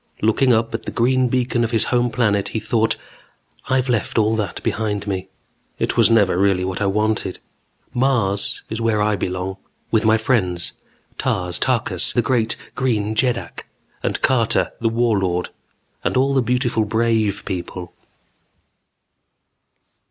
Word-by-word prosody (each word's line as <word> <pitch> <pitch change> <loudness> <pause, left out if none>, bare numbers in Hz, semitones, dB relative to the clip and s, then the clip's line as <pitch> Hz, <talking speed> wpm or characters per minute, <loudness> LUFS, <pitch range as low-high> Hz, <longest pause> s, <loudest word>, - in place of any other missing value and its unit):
Looking 120 +4 +3
up 115 0 +2
at 115 - -4
the - - -4
green 130 +2 +2
beacon 125 -1 0
of 115 - 0
his 115 -2 +2
home 120 -1 +1
planet, 105 -4 +1
he 110 - -3
thought: 110 +1 +1 0.7
I've 130 0 +2
left 120 -3 -1
all 110 0 +3
that 105 -5 -3
behind 105 -2 -1
me. 95 -2 -3 0.5
It - - -1
was - - +5
never 100 -6 +3
really 95 -2 +2
what 95 +2 -3
I 100 - +2
wanted. 105 -1 0 0.6
Mars 120 -6 +1
is 110 +1 -4
where 115 -2 +1
I 105 0 +2
belong. 95 0 -3 0.3
With 110 -1 +3
my 110 0 +4
friends, 95 -7 0 0.5
Tars 90 -1 -1
Tarkas 110 -8 0
the 120 - +2
great 115 -3 +1 0.2
Green 110 -5 0
Jeddak, 120 +1 -1 0.3
and - - -2
Carter, 120 -4 +2
the 115 - +1
Warlord, 100 -7 +1 0.5
and - - 0
all 135 +2 +3
the 135 - +3
beautiful 120 -2 +1
brave 110 -2 +1
people. 90 -1 -5
110 Hz, 145 wpm, -21 LUFS, 100-120 Hz, 0.7 s, was